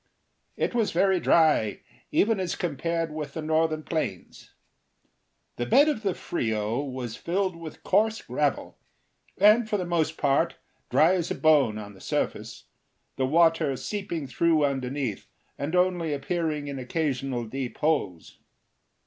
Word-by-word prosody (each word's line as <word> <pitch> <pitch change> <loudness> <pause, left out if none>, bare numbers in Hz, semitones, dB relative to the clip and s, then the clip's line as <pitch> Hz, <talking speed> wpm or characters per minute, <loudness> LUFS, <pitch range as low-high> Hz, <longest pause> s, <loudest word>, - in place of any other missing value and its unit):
It - - -1
was 230 -3 +1
very 190 +1 +2
dry, 155 -12 +3 0.3
even 215 -1 +2
as 185 -2 -2
compared 165 0 -2
with 150 -2 -6
the 160 - -3
northern 155 0 +1
plains. 160 0 -4 1.1
The 120 - -2
bed 285 - +6
of 295 -8 0
the 195 -4 -1
Frio 110 -3 -2
was 130 -4 -5
filled 185 +1 -1
with 165 -2 -10
coarse 220 +1 +2
gravel, - - -2 0.6
and 215 +3 +5
for 210 - +1
the 180 - -3
most 160 -2 0
part 145 +4 +1 0.3
dry 155 +8 +4
as 175 -3 -1
a - - -2
bone 145 -9 +3
on 105 -1 -8
the 95 - -16
surface, - - -3 0.5
the 130 - 0
water 165 -2 +3
seeping 195 -6 -4
through 155 +4 +2
underneath, 135 -4 -3 0.3
and 150 +5 -3
only 180 -3 +1
appearing 150 +1 -2
in 140 -1 -5
occasional 130 -3 -2
deep 130 +2 -5
holes. 145 - -1
155 Hz, 140 wpm, -26 LUFS, 135-175 Hz, 1.1 s, bed